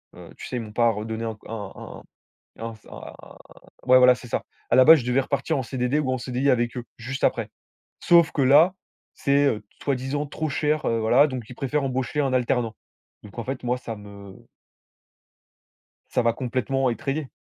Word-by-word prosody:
heu, - - -12
tu - - -8
sais, 125 - -4
ils - - -2
m'ont 110 -2 -9
pas 120 0 +3
redonné 110 +1 -5
un 110 - -3
c 110 - -19
un 105 -3 -8 0.5
un - - -8
un 115 - -9
s 110 - -19
un - - -10 0.7
ouais, 130 0 +7
voilà, 125 0 +7
c'est 125 - -12
ça. - - -2 0.3
À - - +5
la 130 - +8
base, 160 0 +9
je 120 - -7
devais 125 +2 +2
repartir 140 +1 -1
en 130 - -2
CDD 125 +3 -1
ou 135 -4 -1
en 130 - 0
CDI 130 +3 -1
avec 120 -1 0
eux, 120 - -5
juste 130 +4 -6
après. - - +1 0.5
Sauf 170 -1 +5
que 145 - -1
là, 155 +8 +5 0.4
c'est, 140 +1 +2
heu, 110 -6 -2 0.2
soi-disant 140 +2 -2
trop 155 +2 -4
cher, 150 +2 0
heu, 115 - +1
voilà 120 +6 +5
donc 130 -5 -6
ils 125 - -10
préfèrent 140 +3 -1
embaucher 130 +2 -2
un 135 -2 0
alternant. 120 -2 0 0.5
Donc 105 +3 -10
en 115 - -3
fait, 130 -1 -5
moi, 125 +1 0
ça 115 -3 -7
me 100 -1 -13 1.6
ça 125 - 0
m'a 115 0 +2
complètement 130 +1 -1
étrayé! 135 +4 -3
125 Hz, 205 wpm, -24 LUFS, 115-140 Hz, 1.6 s, base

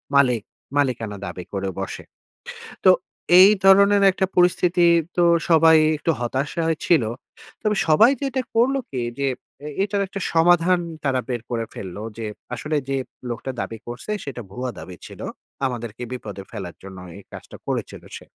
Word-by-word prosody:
মালিক 125 -5 +4 0.4
মালিকানা 115 -7 0
দাবি 90 -2 -6
করে 95 0 -2
বসে। - - -5 0.8
তো 185 - +9 0.5
এই 190 +2 +10
ধরনের 200 +1 +6
একটা 190 - 0
পরিস্থিতি 175 0 +3 0.3
তো 175 - +4 0.3
সবাই 160 0 +6 0.2
একটু 165 +2 0
হতাশায় 140 +7 -1
ছিল। 160 -9 +4 0.6
তবে 210 -1 +1
সবাই 215 - +6
যেটা 270 -1 -1
করলো 265 +4 +3
কি, 130 -3 -3 0.2
যে 140 - +1 0.4
এ - - -4
এইটার 200 0 0
একটা 195 - -6
সমাধান 175 +2 +4 0.2
তারা 135 -2 +1
বের 120 -2 -2
করে 115 -1 -2
ফেলল। 95 -1 -7 0.2
যে 115 - -4 0.3
আসলে 150 +6 -3
যে 135 - 0 0.3
লোকটা 125 +3 -4
দাবি 115 - -5
করছে 120 +12 -6
সেটা 130 -4 -6
ভুয়া 125 +4 -4
দাবি 85 +2 -9
ছিল। - - -11 0.4
আমাদেরকে 120 -2 -4
বিপদে 105 -6 -7
ফেলার 95 -6 -7
জন্য 95 -1 -10 0.2
এই 100 - -12
কাজটা - - -10
করেছিল - - -4
সে। - - -14
140 Hz, 155 wpm, -22 LUFS, 115-180 Hz, 0.8 s, এই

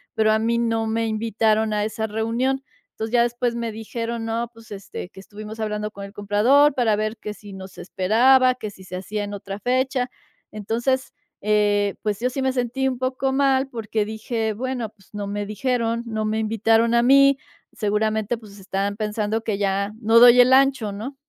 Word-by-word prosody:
pero 215 0 +3
a 215 - +3
mí 230 +1 +1
no 225 -1 0
me 225 +1 0
invitaron 220 0 +1
a 210 0 0
esa 220 +1 -3
reunión. 230 +5 -1 0.3
Entonces 220 0 -5
ya 240 -1 +5
después 240 0 -1
me 230 -2 -3
dijeron: 230 +1 -4
"No, 230 +1 -2
pues, 225 -1 -17
este, 195 -2 -7
que 190 - -14
estuvimos 215 +2 -10
hablando 210 -1 -3
con 200 -1 -8
el 200 - -12
comprador 220 +9 +4
para 235 -5 +2
ver 215 +2 -2
que 210 -1 -6
si 205 -1 -13
nos 190 -1 -10
esperaba, 250 +8 +3
que 220 -4 -6
si 190 -1 -15
se 185 - -7
hacía 205 +3 -4
en 205 - -7
otra 200 0 -6
fecha". 255 +2 0 0.4
Entonces, 235 +5 -1 0.3
eh, 205 -1 +2
pues, 210 -2 -1
yo 250 - +1
sí 270 +2 -4
me 265 0 +1
sentí 255 +1 -1
un 260 -1 -2
poco 260 +1 -1
mal 270 -1 +2
porque 220 -3 -2
dije: 220 +1 -3
"Bueno, 250 +1 -3
pues, 200 -3 -25
no 205 -1 -4
me 205 +1 -3
dijeron, 230 +2 -1
no 220 -1 -2
me 215 +1 -1
invitaron 225 +1 +2
a 235 0 +4
mí". 275 +2 +6 0.4
Seguramente, 215 +1 0
pues, 210 -3 -14
estaban 195 +1 -2
pensando 215 +1 -2
que 215 -3 -1
ya 200 0 0
no 225 +1 +5
doy 245 +1 +8
el 250 +1 +7
ancho, 265 -6 +3
¿no? 230 +8 -6
220 Hz, 195 wpm, -23 LUFS, 210-245 Hz, 0.4 s, doy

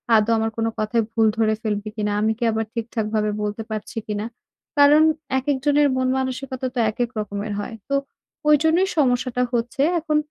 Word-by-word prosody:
আদৌ 215 +1 +3
আমার 225 0 0
কোনো 225 0 +1
কথায় 220 +1 +1
ভুল 225 -1 +3
ধরে 220 -1 +3
ফেলবে 210 -1 -2
কিনা? 210 -1 -1
আমি 220 +1 +2
কি - - -2
আবার 220 0 -1
ঠিকঠাকভাবে 220 -2 -1
বলতে 210 +2 -3
পারছি 215 +1 -6
কিনা? 210 0 -2 0.5
কারণ 290 +2 +7 0.4
একেকজনের 290 +2 +2
মন-মানসিকতা 260 0 -1
তো - - 0
একেক 240 +2 -2
রকমের 205 0 -4
হয়। 225 +2 -5
তো 280 - +1 0.5
ওইজন্যই 320 +6 +4
সমস্যাটা 250 -2 +2
হচ্ছে। 240 +4 -1 0.2
এখন 305 -1 0
230 Hz, 155 wpm, -22 LUFS, 215-265 Hz, 0.5 s, কারণ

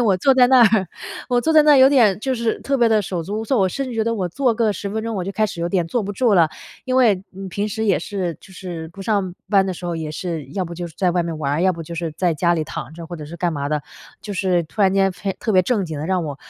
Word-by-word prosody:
我 205 -6 +3
坐 270 +9 +4
在 250 -1 +6
那 250 -2 +6
儿 195 -4 +1 0.4
我 245 -1 +2
坐 320 - +1
在 310 -1 +7
那 300 0 +6
儿 - - +7
有 265 0 +8
点， 220 -8 +4
就 260 +3 -1
是 230 -1 -1
特 275 0 0
别 235 -2 +4
地 220 -1 +3
手 175 -2 -3
足 205 +6 -4
无 - - -5
措， 265 +2 0
我 190 -1 +3
甚 275 +8 -3
至 245 - -6
觉 220 - +1
得 230 +1 0
我 185 -4 -2
坐 255 +5 +1
个 220 -2 +1
10 200 - -5
分 220 +1 -3
钟 230 -1 -3
我 190 - -2
就 195 - -3
开 215 +2 +1
始 170 - -7
有 170 - -1
点 175 -2 0
坐 230 +6 -1
不 200 - -4
住 215 +1 +2
了， 165 -3 +5 0.4
因 255 0 -1
为， 210 -7 +4
嗯， 190 0 -8
平 205 +4 -2
时 220 +2 -3
也 195 -7 +2
是， 180 -2 -3
就 190 - -16
是 175 -4 -7
不 170 +4 -13
上 195 -3 -1 0.2
班 195 -2 +4
的 190 - -2
时 175 0 -7
候 170 - -2
也 160 -2 -4
是， 165 -2 -4
要 185 +7 -3
不 170 0 -7
就 175 0 -5
是 160 - -17
在 180 -2 +2
外 175 -1 +1
面 165 -2 -4
玩 145 -2 -1
儿， 160 +4 0
要 185 0 +3
不 165 - -8
就 170 - -7
是 165 -1 -3
在 175 -3 +1
家 170 +3 +2
里 160 -2 -1
躺 150 -2 -7
着， 165 -1 -9
或 175 - -7
者 155 -2 -7
是 170 +3 -9
干 170 0 -1
嘛 140 -1 -3
的。 150 -1 -1 0.4
就 205 - -6
是 180 -3 +1
突 205 +6 -3
然 190 -1 +4
间 195 -1 +2
非 195 +1 -4
特 220 - -2
别 185 -1 +5
正 205 -1 0
经 155 -3 -5
地 155 - -4
让 185 -3 0
我 145 -2 -5
190 Hz, 345 characters per minute, -21 LUFS, 170-220 Hz, 0.4 s, 有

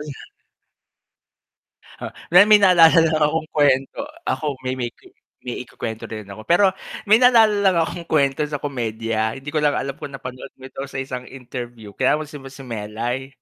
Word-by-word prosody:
Uy. 150 - -8 1.9
Ha - - -5 0.2
'di 180 +4 +8
may 210 0 +7
naalala 165 -3 +6
lang 155 - +1
akong 155 +1 0
kuwento 135 -3 +1 0.2
ako 150 - -2
may 130 0 -3
may 120 - -1
kwi - - -20 0.3
may 125 - -5
ikukuwento 110 -1 -6
rin 110 -2 -7
ako 100 +2 -9
pero, 190 +3 +4 0.4
may - - +9
naalala 225 -4 +5
lang 190 -2 +4
akong 170 +1 -2
kuwento 140 -2 +2
sa 145 -1 -4
komedya 115 -4 -2
hindi 135 +2 -8
ko 155 - -1
lang 145 -1 +2
alam 135 0 -3
kung - - -7
napanood 130 0 -8
mo 130 - -10
ito 135 - -8
sa - - -6
isang 125 -2 -5
interview, 120 -4 -8
kaya - - +2
mo - - -4
si 145 0 -10
mo - - -12
si 135 +1 -12
Melai? 120 +4 -4
135 Hz, 185 wpm, -21 LUFS, 125-160 Hz, 1.9 s, may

